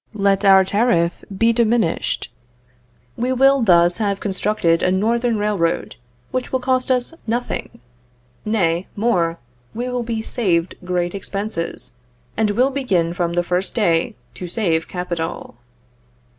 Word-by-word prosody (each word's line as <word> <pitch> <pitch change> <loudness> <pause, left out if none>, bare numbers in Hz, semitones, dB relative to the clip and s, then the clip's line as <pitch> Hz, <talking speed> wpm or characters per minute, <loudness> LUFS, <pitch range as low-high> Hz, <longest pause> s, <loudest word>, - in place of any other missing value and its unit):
Let 200 -1 +2
our 190 -1 +6
tariff 185 -5 +1
be 230 +3 +3
diminished. 225 - 0 0.8
We 250 +2 -1
will 270 +1 +4
thus 175 -4 +4
have 200 -3 -1
constructed 190 -4 +1
a - - +2
Northern 230 +4 +1
Railroad 205 -5 -1 0.4
which 255 -1 -3
will 260 - +1
cost 255 0 0
us 255 +4 +1
nothing. 240 - -3 0.6
Nay, 180 -5 0
more, 180 -7 +1 0.4
we 240 +2 -3
will 250 0 -2
be 230 -2 -3
saved 180 -8 0
great 180 -1 -1
expenses, 200 -2 -4 0.4
and 220 -1 +1
will 250 +6 +2
begin 190 -12 0
from 175 -2 -1
the 175 0 +1
first 180 +2 -1
day 175 0 +1 0.2
to 180 - -7
save 170 -4 0
capital. 175 -7 -5
200 Hz, 130 wpm, -20 LUFS, 175-235 Hz, 0.8 s, our